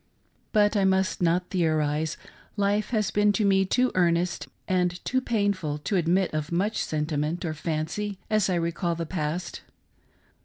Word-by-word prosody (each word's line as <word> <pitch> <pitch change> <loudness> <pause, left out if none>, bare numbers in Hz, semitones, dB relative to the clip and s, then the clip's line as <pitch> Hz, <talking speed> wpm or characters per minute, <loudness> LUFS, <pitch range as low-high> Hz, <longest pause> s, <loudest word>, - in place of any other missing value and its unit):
But 210 0 +3
I 200 - +3
must 190 -1 +1
not 175 +1 +1
theorise: 155 -3 0 0.4
life 205 +1 +1
has 215 -3 0
been 205 0 +3
to 210 0 +1
me 195 -1 +4
too 250 +6 +2
earnest 175 0 +1 0.2
and 180 -1 +1
too 260 0 +1
painful 200 -11 0
to 150 +7 -3
admit 180 +1 +2
of 155 +1 -3
much 200 +6 0
sentiment 155 +2 -2
or 160 - -2
fancy 165 +7 -3
as 215 -3 +2
I 185 - +1
re 170 0 0
call 170 0 -2
the 165 0 -3
past. 165 +1 -3
180 Hz, 160 wpm, -26 LUFS, 165-200 Hz, 0.4 s, me